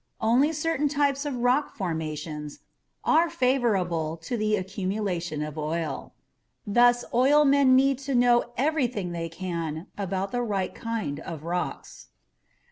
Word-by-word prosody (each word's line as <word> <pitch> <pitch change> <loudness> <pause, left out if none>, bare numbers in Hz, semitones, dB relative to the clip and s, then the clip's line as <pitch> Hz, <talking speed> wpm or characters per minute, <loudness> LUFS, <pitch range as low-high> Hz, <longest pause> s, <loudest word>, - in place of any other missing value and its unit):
Only 245 +7 +3
certain 305 -2 0
types 280 0 +1
of 280 - -3
rock 250 +4 +1
formations 155 -4 -4 0.4
are 330 +2 +4
favorable 190 - 0
to 165 +9 -4
the 215 -1 +1
accumulation 185 -5 -3
of 150 0 -6
oil. 160 +2 -3 0.5
Thus, 240 +3 +4
oilmen 275 +1 +5
need 270 0 +3
to 275 -1 -3
know 240 0 +4
everything 250 - 0
they 165 -1 -4
can 165 -2 -4
about 195 0 -2
the 245 - -1
right 200 -5 -2
kind 220 -11 -4
of 160 -1 -7
rocks. 175 +2 -4
215 Hz, 125 wpm, -26 LUFS, 170-260 Hz, 0.5 s, oilmen